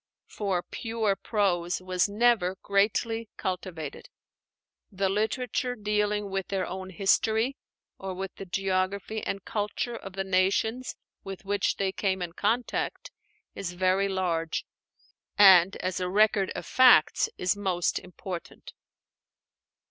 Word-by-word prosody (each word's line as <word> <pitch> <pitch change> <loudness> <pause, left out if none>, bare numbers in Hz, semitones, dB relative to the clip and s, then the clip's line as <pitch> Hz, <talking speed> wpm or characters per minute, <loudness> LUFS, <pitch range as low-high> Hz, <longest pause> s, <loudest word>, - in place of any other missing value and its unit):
For 190 -4 -2
pure 225 -3 -1
prose 190 -4 0
was 185 +1 0
never 210 -4 +2
greatly 220 +3 +1
cultivated. 175 -5 -5 0.8
The 195 -1 0
literature 245 +4 -1
dealing 210 -1 -1
with 195 -1 -2
their 190 -2 -1
own 190 0 -6
history, 220 +6 +1 0.4
or 190 -1 -5
with 190 +1 -5
the 195 - -8
geography 195 +3 -1
and 195 -1 -4
culture 215 +3 -2
of 195 -4 -8
the 195 0 -2
nations 195 +6 0 0.3
with 195 0 -8
which 200 0 0
they 195 -1 0
came 190 -2 -1
in 170 -1 -6
contact, 230 - -1 0.4
is 180 -3 -5
very 185 +2 +2
large, 170 -4 -1 0.7
and 190 -2 +8
as 185 0 -3
a 180 0 -2
record 205 0 +3
of - - -5
facts 250 -11 +5
is 180 +2 +1
most 185 -4 0
important. 180 -1 -8
195 Hz, 125 wpm, -27 LUFS, 185-210 Hz, 0.8 s, and